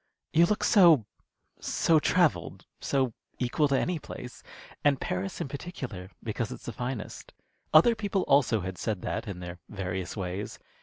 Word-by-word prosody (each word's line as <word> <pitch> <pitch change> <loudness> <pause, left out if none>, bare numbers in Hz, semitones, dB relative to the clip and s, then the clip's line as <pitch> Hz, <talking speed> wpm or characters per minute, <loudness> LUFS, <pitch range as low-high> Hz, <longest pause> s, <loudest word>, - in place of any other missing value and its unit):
"You 170 +2 +6
look 210 - 0
so 170 - +6 0.5
so 160 -2 +3
travelled, 175 0 +1
so 130 -4 0 0.2
equal 130 +4 +1
to 140 -1 +2
any 175 -2 -1
place, 125 -4 -9 0.4
and 140 -2 +3
Paris 95 +2 -3
in - - -2
particular 135 - -6
because 115 +1 -3
it's - - -9
the 120 - -5
finest." 125 0 -5 0.4
Other 165 +10 +7
people 205 -4 -1
also 125 -6 +3
had 90 0 -5
said 105 -5 -2
that, - - -3
in 95 -3 -6
their 90 0 -7
various 95 -1 -4
ways. 95 +2 -4
125 Hz, 155 wpm, -28 LUFS, 100-155 Hz, 0.5 s, Other